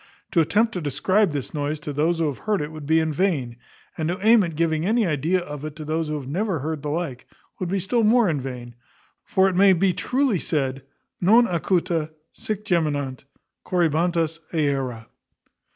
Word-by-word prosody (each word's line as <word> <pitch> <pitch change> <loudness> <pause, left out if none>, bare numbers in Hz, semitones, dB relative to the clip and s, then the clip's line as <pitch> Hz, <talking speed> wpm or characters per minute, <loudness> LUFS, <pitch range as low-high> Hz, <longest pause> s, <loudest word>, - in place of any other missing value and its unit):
To 170 - +4
attempt 215 +8 +2
to 180 - -3
describe 165 +7 +1
this 145 -3 -5
noise 150 0 -2
to 150 -1 -5
those 160 +4 +1
who 165 - +1
have 145 -4 -3
heard 215 -2 0
it 150 +1 -4
would 155 -2 -9
be 160 +1 +4
in 160 -1 0
vain; 145 -9 0 0.4
and 160 0 -2
to 180 - -1
aim 225 0 +7
at 170 -4 -2
giving 160 -1 0
any 220 +4 +2
idea 165 +3 +1
of 150 -4 -7
it 155 -1 -6
to 155 -1 -8
those 160 +1 -1
who 150 - -2
have 140 -3 -6
never 185 +5 -1
heard 155 +1 -4
the 150 - -4
like, 150 -5 -4 0.3
would 180 - -3
be 195 - 0
still 215 +5 0
more 215 -4 +4
vain: 125 -4 -6 0.5
for 190 0 +2
it 190 - -1
may 195 +1 +6
be 185 +1 +2
truly 250 +3 0
said 135 -5 -1
_ - - -13 0.4
Non 225 +7 +6
acuta 170 -2 0 0.2
Sic 215 -1 -5
geminant 145 -7 -1 0.4
Corybantes 165 -1 +1
aera. 135 -7 -1
160 Hz, 195 wpm, -23 LUFS, 150-185 Hz, 0.5 s, aim